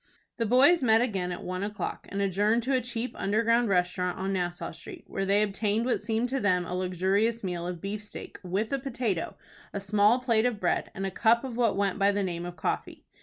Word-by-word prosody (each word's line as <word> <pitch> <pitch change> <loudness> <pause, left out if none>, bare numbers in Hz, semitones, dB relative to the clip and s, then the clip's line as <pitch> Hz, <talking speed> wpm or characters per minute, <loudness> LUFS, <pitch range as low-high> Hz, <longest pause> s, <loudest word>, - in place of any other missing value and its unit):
The 230 -2 0
boys 275 +9 +5
met 225 -3 +5
again 195 -7 -1
at 175 - -6
one 185 +1 -4
o'clock, 205 +1 -4
and 200 0 -1
adjourned 205 +4 +2
to 265 +3 0
a 255 - +2
cheap 240 0 -3
underground 230 +3 +2
restaurant 180 -1 +1
on 190 +1 -2
Nassau 175 -1 -2
Street, - - -8
where 195 - -3
they 200 +2 +3
obtained 210 +2 0
what 250 - 0
seemed 225 +3 0
to 270 +2 -1
them 180 -5 +2
a 180 - -5
luxurious 190 +5 0
meal 175 -2 -3
of 175 -2 -5
beefsteak, 210 +1 -6
with 195 +6 -2
a 275 - +1
potato, 240 -9 -2 0.4
a 200 - -2
small 205 +3 +3
plate 240 -2 +2
of 230 -4 -3
bread, 180 - 0
and 195 - -3
a 190 - -2
cup 230 +5 +3
of 255 -3 -5
what 235 -4 +2
went 200 0 0
by 200 0 +4
the 200 0 0
name 175 -2 -3
of 175 - -7
coffee. 160 - -3
205 Hz, 220 wpm, -28 LUFS, 185-230 Hz, 0.4 s, boys